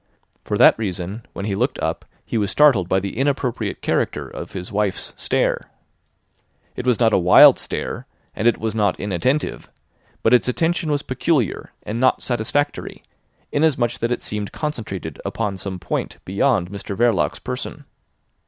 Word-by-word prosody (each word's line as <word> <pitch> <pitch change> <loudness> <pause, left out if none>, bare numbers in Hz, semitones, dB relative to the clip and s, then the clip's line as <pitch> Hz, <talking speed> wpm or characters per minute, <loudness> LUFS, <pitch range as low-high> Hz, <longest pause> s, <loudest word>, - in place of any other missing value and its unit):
For - - -2
that - - +6
reason, 100 +1 -4
when 100 - -5
he 105 - -1
looked 95 - 0
up - - -2 0.2
he - - -5
was 105 -3 +1
startled 130 -12 +4
by 95 - +3
the 100 0 -5
inappropriate 135 -1 -1
character - - 0
of - - -8
his 90 -1 -6
wife's 105 -1 -1
stare. - - 0 1.1
It 125 - -5
was 125 -3 +3
not 115 -3 +4
a - - +5
wild 90 0 +8
stare, - - -4 0.3
and 115 - +1
it 120 - +4
was 110 -1 -2
not 105 -4 +1
inattentive, 105 - -1 0.5
but 115 - +4
its 125 - +4
attention 165 +4 0
was 145 -1 0
peculiar 130 - -1
and 110 +3 -4
not 130 +1 +3
satisfactory, 130 +5 -2 0.5
inasmuch 135 -6 +1
that 115 +1 -1
it 125 - -2
seemed 105 -1 -4
concentrated 105 - -5
upon 105 -3 -2
some 95 0 -5
point 90 - -3
beyond 100 -1 +1
Mr 100 -1 -6
Verloc's 120 0 +2
person. 130 +3 -6
115 Hz, 160 wpm, -21 LUFS, 100-130 Hz, 1.1 s, wild